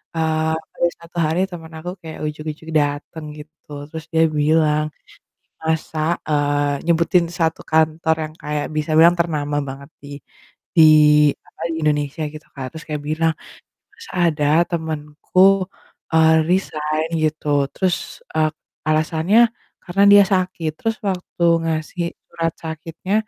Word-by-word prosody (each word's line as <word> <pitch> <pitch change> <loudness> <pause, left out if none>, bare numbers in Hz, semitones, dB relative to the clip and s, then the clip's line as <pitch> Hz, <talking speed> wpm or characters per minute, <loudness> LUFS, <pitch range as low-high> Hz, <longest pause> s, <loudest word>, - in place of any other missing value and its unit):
eee, 160 0 0 0.2
ada 175 - +2
1 170 +1 -13
hari 160 +3 0
temen 165 -2 -8
aku 175 +3 -6
kayak 160 -1 -9
ujug-ujug 155 +1 -6
dateng 145 +2 -3
gitu 150 0 -15 0.2
terus 160 0 -7
dia 160 - +4 0.2
bilang, 155 0 +3 0.8
masak, 160 0 -1 0.2
eee, 145 -1 0
nyebutin 170 +1 +3
1 160 -1 0
kantor 160 0 +2
yang 155 - -7
kayak 150 0 -2
bisa 155 +1 -1
bilang 170 +2 +7
ternama 150 -3 -1
banget 140 +2 -8
di 145 - -10 0.7
di 160 - +8 0.6
apa - - -18
di 160 - -3
Indonesia 150 +1 0
gitu, 155 0 -11
Kak, 135 - -5
terus 160 - -9
kayak 150 -1 -4
bilang, 160 +1 +1 0.6
masa 460 - -13 0.2
ada 150 -1 -2 0.2
temenku, 170 +4 +1 0.5
eee, 160 0 +5 0.2
resign 155 -4 0 0.2
gitu, 155 0 -1 0.3
terus, 185 -2 +1 0.4
eee, 155 0 +3 0.4
alasannya 160 +6 +2 0.4
karena 190 +3 +1
dia 205 0 +9
sakit, 180 -4 -1
terus 225 -1 -1
waktu 180 -1 -4 0.2
ngasih 160 +2 -2 0.2
surat 165 -1 -2
sakitnya, 165 +4 -6
160 Hz, 130 wpm, -20 LUFS, 150-170 Hz, 0.8 s, dia